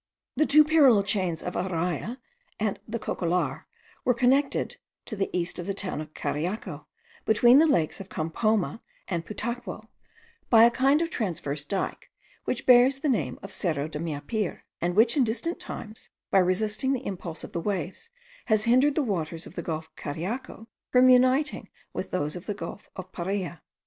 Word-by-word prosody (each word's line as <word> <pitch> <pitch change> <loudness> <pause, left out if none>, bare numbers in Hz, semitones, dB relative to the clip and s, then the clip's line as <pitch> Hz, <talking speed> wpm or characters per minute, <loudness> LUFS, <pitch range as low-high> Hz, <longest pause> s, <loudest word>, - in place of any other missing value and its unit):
The 310 - +2
two 305 +2 +7
parallel 285 -9 +5
chains 185 -5 -1
of 180 - -4
Araya 180 - -2 0.4
and 215 -2 -1
the 230 +1 -3
Cocollar 170 - -1 0.4
were 250 - +2
connected, 265 +3 +2 0.3
to 220 - -6
the 195 -1 -1
east 180 0 -2
of 175 - -5
the 195 - -2
town 190 -6 -2
of 155 0 -10
Cariaco, 150 0 -3 0.4
between 240 +4 +6
the 325 - +5
lakes 170 - +1
of 195 0 -9
Campoma 210 +7 0 0.3
and 170 -3 -2
Putaquao, 220 -1 -5 0.6
by 225 -1 +7
a 235 - +7
kind 270 +6 +3
of 330 - -4
transverse 155 - -2
dyke, 190 +5 -3 0.4
which - - -2
bears 255 +2 +6
the 300 - +1
name 245 - 0
of 195 - -7
Cerro 155 -7 -1
de 155 -1 -6
Meapire, 170 +6 -3 0.2
and 175 +1 0
which 225 +3 +5
in 280 - +4
distant 255 +11 -2
times, 225 -11 -8 0.2
by 195 - +5
resisting 210 +8 +1
the 265 0 -3
impulse 175 -4 -5
of - - -8
the 170 - -3
waves, 195 - -3 0.4
has 215 -2 +3
hindered 255 +5 +4
the 305 - +2
waters 165 - -2
of - - -11
the - - -4
gulf 160 -1 -4
of - - -31
Cariaco 215 - -5 0.2
from 255 0 +6
uniting 255 +4 +3 0.2
with - - -4
those 150 -4 -2
of 180 - -9
the 205 - -2
gulf 205 - -8
of 185 0 -8
Paria. 180 -2 -3
205 Hz, 175 wpm, -27 LUFS, 170-250 Hz, 0.6 s, two